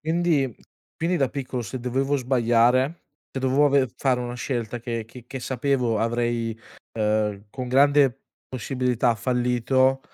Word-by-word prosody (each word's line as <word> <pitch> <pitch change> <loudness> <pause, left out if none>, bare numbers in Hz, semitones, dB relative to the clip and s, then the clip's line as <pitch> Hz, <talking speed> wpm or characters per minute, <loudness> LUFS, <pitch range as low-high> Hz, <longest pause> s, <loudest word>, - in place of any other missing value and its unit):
Quindi 160 -6 +1 0.4
quindi 170 +2 0
da 135 -2 +2
piccolo 130 -2 -4
se 115 +5 -6
dovevo 135 +3 0
sbagliare 125 +3 +2 0.3
e - - -5
dovevo 135 +2 +3
aver 140 -4 +2
fare 130 -2 +1
una 120 0 -4
scelta 120 -2 -3
che 115 -1 -4
che 120 +2 -13
che 130 0 -6
sapevo 125 -3 0
avrei, 115 -1 -1 0.4
uhm, 105 -1 0
con 125 +1 -5
grande 135 0 +4 0.3
possibilità 125 -1 0
fallito, 125 +3 +1
125 Hz, 135 wpm, -24 LUFS, 120-135 Hz, 0.4 s, grande